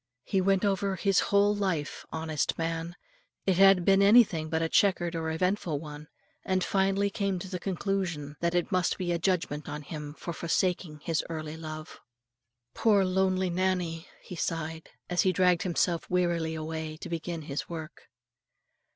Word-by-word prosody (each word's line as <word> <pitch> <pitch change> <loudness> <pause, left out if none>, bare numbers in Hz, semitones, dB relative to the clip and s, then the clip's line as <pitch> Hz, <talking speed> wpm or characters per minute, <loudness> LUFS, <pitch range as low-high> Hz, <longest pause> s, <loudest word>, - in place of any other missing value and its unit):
He 190 +6 0
went 195 +1 +2
over 195 -1 0
his 195 0 +2
whole 205 +1 +4
life, 185 -8 -2
honest 160 -2 -1
man, 165 +1 -3 0.5
it 190 -3 +2
had 195 -2 +6
been 195 0 +5
anything 200 -7 +5
but 160 0 0
a - - +1
chequered 175 -1 +2
or 160 -1 -2
eventful 175 -2 0
one, 150 0 -9 0.4
and 185 -1 0
finally 195 +1 +1
came 195 -1 -1
to 180 - -6
the 180 -1 -4
conclusion 180 -6 -2
that 170 +1 0
it 175 +2 0
must 185 -1 +1
be 180 -2 -2
a 170 - 0
judgment 165 -5 -1
on 150 0 -5
him 150 0 -7
for 170 - -6
forsaking 170 -2 -1
his 165 -2 0
early 155 -1 -5
love. 155 -1 -8 0.7
"Poor 205 -4 +3
lonely 185 0 +1
Nannie!" 180 -2 -1 0.2
he 180 - -8
sighed, 160 -1 -3 0.2
as 180 0 +2
he 185 - +3
dragged 180 -1 +3
himself 175 -1 0
wearily 170 -3 0
away 160 0 -5
to - - -8
begin 165 -1 -4
his 145 -1 -4
work. 160 -2 -8
175 Hz, 165 wpm, -29 LUFS, 160-190 Hz, 0.7 s, had